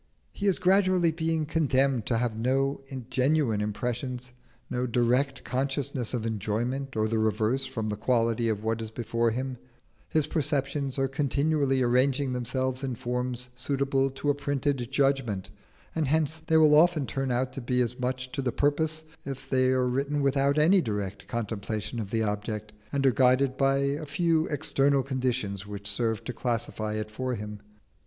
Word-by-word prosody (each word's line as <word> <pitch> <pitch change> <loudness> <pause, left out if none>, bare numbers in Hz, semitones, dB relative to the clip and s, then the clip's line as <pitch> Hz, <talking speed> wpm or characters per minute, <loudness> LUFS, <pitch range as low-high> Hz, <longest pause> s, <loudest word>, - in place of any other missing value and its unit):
He 200 - -3
is 195 - +3
gradually 185 -2 +3
being 160 -1 -1
condemned 135 -6 +1
to 115 - +2
have 115 -1 0
no 135 +4 0 0.3
genuine 130 -5 +2
impressions, 125 +4 -3 0.3
no 125 +1 -1
direct 125 +3 +1
consciousness 135 -1 -1
of 115 -2 -3
enjoyment 115 +5 -2
or 110 0 +1
the 110 0 0
reverse 110 +5 +1
from 110 -2 -3
the 105 - -1
quality 115 0 +1
of 105 -1 -2
what 115 0 -1
is 110 - -4
before 115 +1 0
him: 130 +2 -3 0.5
his 155 -2 +2
perceptions 140 -3 -1
are 135 0 +2
continually 140 -1 +1
arranging 130 +2 +2
themselves 130 +2 -2
in 130 -2 -2
forms 125 +1 -3
suitable 135 +1 0
to 135 +2 -1
a - - +1
printed 140 -3 -1
judgment, 135 -8 0 0.4
and 160 -3 0
hence 155 +2 +1
they 160 - +4
will 155 -1 +6
often 155 -1 +5
turn 135 +3 -2
out 125 +1 0
to 135 - -5
be 125 +1 0
as 125 0 0
much 130 0 -2
to 140 - -2
the 130 -2 0
purpose 155 +3 0 0.2
if 135 -1 -6
they 130 -1 +2
are 130 0 +2
written 140 +3 0
without 140 +1 +2
any 175 +5 +5
direct 105 - -4
contemplation 110 0 -3
of 105 -3 -4
the 110 +1 0
object, 105 0 -3 0.2
and 140 -1 0
are 135 - +6
guided 130 +2 +3
by 135 0 +3
a 140 +2 -1
few 165 +1 +1
external 140 -1 +2
conditions 125 -7 -2
which 100 0 -7
serve 110 +1 0
to 125 - -5
classify 115 -3 -2
it 110 0 -4
for 130 +3 -2
him. 105 -1 -6
130 Hz, 170 wpm, -28 LUFS, 115-140 Hz, 0.5 s, will